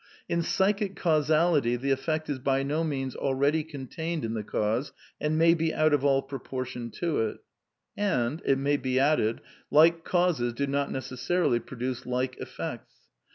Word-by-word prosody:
In 170 - 0
psychic 195 +3 +1
causality 155 -6 +2
the 135 +3 -1
effect 155 +4 -1
is 145 -3 -2
by 135 +1 +1
no 150 +4 0
means 135 -5 -2
al 135 -1 0
^Y - - -6
ready 150 +3 +2
contained 160 +1 -4
in 110 - -3
the 110 - -2
cause 110 +6 -1 0.3
and 155 +1 0
may 165 +1 +6
be 165 -1 0
out 155 -1 +2
of 145 -2 +2
all 135 -1 +3
pro 135 0 -6
portion 125 -2 -5
to 170 -3 -1
it. 110 -1 -1 0.6
And, 150 -8 0
it 135 - +2
may 140 +2 +1
be 130 -1 0
added, 135 -6 +2 0.3
like 165 +2 +5
causes 175 -11 +1
do 140 +4 -1
not 140 0 -1
necessarily 130 +1 0
produce 125 +1 -5
like 125 +1 -1
effects. - - -6
140 Hz, 175 wpm, -28 LUFS, 130-160 Hz, 0.6 s, may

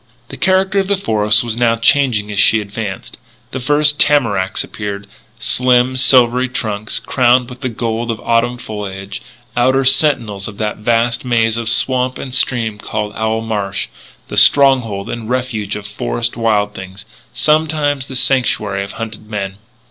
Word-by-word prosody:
The - - -7
character 190 +1 +1
of 195 - -1
the 200 0 0
forest 105 - +2
was 115 -2 -2
now 120 -1 +2
changing 115 -3 +2
as 100 - -2
she 110 - +5
advanced. 100 -1 -6 0.3
The 130 - -4
first 150 +3 +2
tamaracks 115 -11 +2
appeared, 100 -1 -6 0.3
slim, 125 0 +2
silvery 125 -1 +4
trunks, 110 -4 -3
crowned 125 -1 +2
with 125 +1 -11
the 130 - -2
gold 115 0 -3
of 115 -2 -3
autumn 120 +1 0
foliage, 100 -4 -7 0.3
outer 130 +2 +2
sentinels 120 -8 +2
of 100 -2 -10
that 105 -1 -3
vast 115 +2 0
maze 115 -3 +1
of 115 -1 -1
swamp 125 +2 +2
and 130 - -7
stream 115 -5 0
called 105 0 -4
Owl 110 +1 -1
Marsh, 105 -3 -3 0.4
the - - -6
stronghold 125 -8 +4
and 115 -1 -6
refuge 120 -5 -2
of 105 -1 -7
forest - - -3
wild 105 -3 0
things 95 +1 -10 0.3
sometimes 150 -3 0
the 130 - -7
sanctuary 105 -7 +1
of 100 - -8
hunted 110 -3 -8
men. 100 -2 -5
115 Hz, 155 wpm, -16 LUFS, 105-130 Hz, 0.4 s, she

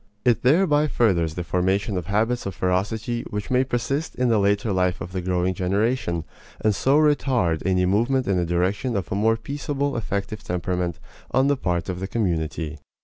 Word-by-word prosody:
It 120 -2 +3
thereby 150 +1 +4
furthers 85 - +1
the 90 - -3
formation 95 +4 0
of 90 -3 -3
habits 110 +3 0
of 95 - -5
ferocity 105 +7 -1
which 105 +2 -4
may 130 +1 +4
persist 135 +4 -2
in 125 -1 +1
the 110 -2 +3
later 100 +1 +1
life 90 -1 +1
of 90 - -6
the 90 0 -3
growing 90 0 0
generation, 95 -1 0 0.4
and 110 -1 +2
so 135 +8 +2
retard 130 - +2
any 90 -1 +2
movement 120 +7 +2
in 100 - +2
the 90 - +1
direction 95 +8 0
of 90 -6 -4
a - - 0
more 110 +3 +2
peaceable 140 +2 -3
effective 105 -1 -3
temperament 90 -1 -2 0.3
on 130 +3 +2
the 145 - +3
part 90 -9 -2
of 90 -2 -3
the 95 - -3
community. 80 -7 -2
100 Hz, 185 wpm, -24 LUFS, 90-125 Hz, 0.4 s, thereby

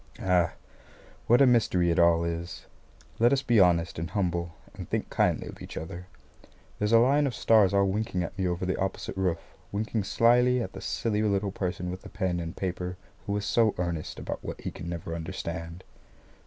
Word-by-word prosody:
Ah, 90 -3 +2 0.7
what 120 +4 +6
a - - +7
mystery 105 -8 +3
it 85 - +1
all 85 -1 +5
is! 85 +1 -4 0.5
Let 120 +2 +5
us 140 0 +2
be 120 -4 +3
honest 85 -3 +3
and 85 0 -4
humble 85 -4 -2 0.2
and - - -9
think - - -2
kindly - - +1
of - - -10
each - - -8
other. 85 +3 -7 0.7
There's 105 +1 0
a 115 - +7
line 140 +5 +4
of 125 - -3
stars 105 -4 +4
all 100 0 +3
winking 100 -1 -1
at 85 - -6
me 95 -1 -1
over 90 +1 -2
the 95 - 0
opposite 95 0 -3
roof 95 -3 -2 0.2
winking 105 0 -2
slyly 125 +4 +4
at 120 - -4
the - - -8
silly 110 -3 -1
little 100 -2 0
person 90 -2 -3
with 95 - -7
the - - -11
pen 95 -4 -1
and 85 0 -6
paper 90 -1 -3 0.3
who 100 0 0
is 100 - -3
so 115 -3 +2
earnest 85 -3 -3
about - - -5
what - - -6
he - - -4
can 85 - -7
never 85 -1 -5
understand. 85 0 -5
95 Hz, 195 wpm, -28 LUFS, 85-110 Hz, 0.7 s, a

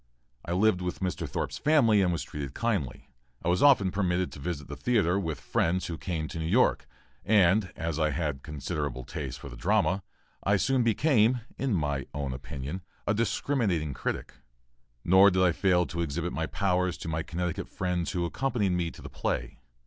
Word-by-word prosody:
I 85 - -3
lived 95 0 +3
in 90 - -2
Mr. 90 0 -3
Thorp's - - -3
family 120 -9 +4
and 90 -2 +2
was 85 - -2
kindly 75 - -2
treated. - - -16 0.4
I - - +2
was 90 - +2
often 125 -10 +5
permitted 90 -2 0
to - - -10
visit 75 -2 -4
the 75 - -6
theatre 95 - +2
with 80 -7 -3
friends 90 +6 0
who 85 - -4
came 80 -4 -3
to 80 - -5
New 80 - -2
York, 120 +9 +3 0.4
and, 95 -2 +4
as 80 -1 -3
I 80 -1 +2
had 75 -2 -2
considerable 75 -3 -4
taste - - -5
for - - -9
the - - -9
drama, 100 - +1 0.4
I 100 +1 +3
soon 130 +5 +2
became, 120 0 +3
in 135 -6 0
my 70 -4 -1
own 70 -3 -2
opinion, 70 +7 -6 0.2
a 100 - +2
discriminating 105 - 0
critic - - -4 0.7
nor 95 +3 +7
did 95 -1 +2
I 90 - +5
fail 90 +1 +2
to 85 0 -4
exhibit 85 +2 -2
my 80 0 -2
powers 90 -2 0
to - - -7
my 80 0 -1
Connecticut 85 +1 -3
friends 90 -2 -2
who 90 -2 0
accompanied 110 0 0
me 90 -2 0
to - - -13
the - - -6
play. - - -3
90 Hz, 185 wpm, -28 LUFS, 80-100 Hz, 0.7 s, nor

